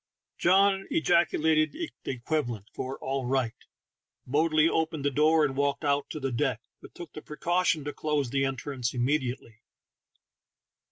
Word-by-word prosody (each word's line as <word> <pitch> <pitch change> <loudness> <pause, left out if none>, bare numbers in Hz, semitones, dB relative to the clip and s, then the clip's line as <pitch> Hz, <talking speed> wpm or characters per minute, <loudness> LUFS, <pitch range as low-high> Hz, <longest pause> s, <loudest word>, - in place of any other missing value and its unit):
John 195 +2 +4
ejaculated 160 -1 +2
the 335 0 -5 0.2
equivalent 120 -5 -3
for 130 +1 -5
"all 135 0 -3
right," 130 -3 0 0.7
boldly 155 +3 +3
opened 160 -3 -1
the 145 - +2
door, 155 +3 +4
and 135 -2 -3
walked 140 +1 0
out 140 0 +1
to 155 - -5
the 135 -2 -2
deck, 125 -2 0 0.2
but - - -14
took 175 -3 -9
the 155 - -8
precaution 170 +1 0
to 145 +1 -4
close 150 -5 -1
the 135 0 +1
entrance 135 -2 -3
immediately. 125 -3 -2
145 Hz, 145 wpm, -28 LUFS, 130-160 Hz, 0.7 s, John